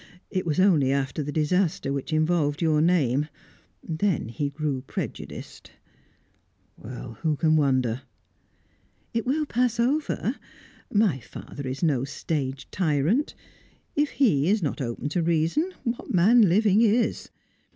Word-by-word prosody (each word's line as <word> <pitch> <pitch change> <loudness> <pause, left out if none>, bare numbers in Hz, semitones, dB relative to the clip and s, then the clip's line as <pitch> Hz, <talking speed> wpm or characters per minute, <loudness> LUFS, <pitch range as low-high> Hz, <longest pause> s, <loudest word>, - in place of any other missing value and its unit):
It 185 -3 -2
was 160 +2 0
only 160 -9 +4
after 135 +1 -1
the 145 0 -4
disaster 155 -1 0
which 140 +2 -4
involved 155 -2 +1
your 155 -3 +2
name. 150 -5 +2 0.6
Then 165 - -1
he 145 +4 -2
grew 145 -2 -2
prejudiced." 130 - -7 1.1
"Who 125 +5 -4
can 155 +1 +2
wonder?" 130 -5 +1 1.1
"It 230 +1 -1
will 300 +4 +1
pass 245 -3 0
over. 280 +6 0 0.5
My 205 -10 +2
father 135 +3 -9
is 130 +6 -4
no 140 -6 +2
stage 140 -1 -3
tyrant. 175 - +1 0.6
If 295 0 +2
he 170 - +3
is 210 -2 +2
not 145 - -2
open 120 +2 -3
to 170 +3 0
reason, 170 - +1
what 235 0 -3
man 205 +3 +5
living 205 +3 +4
is? 230 +1 +1
155 Hz, 130 wpm, -25 LUFS, 140-205 Hz, 1.1 s, man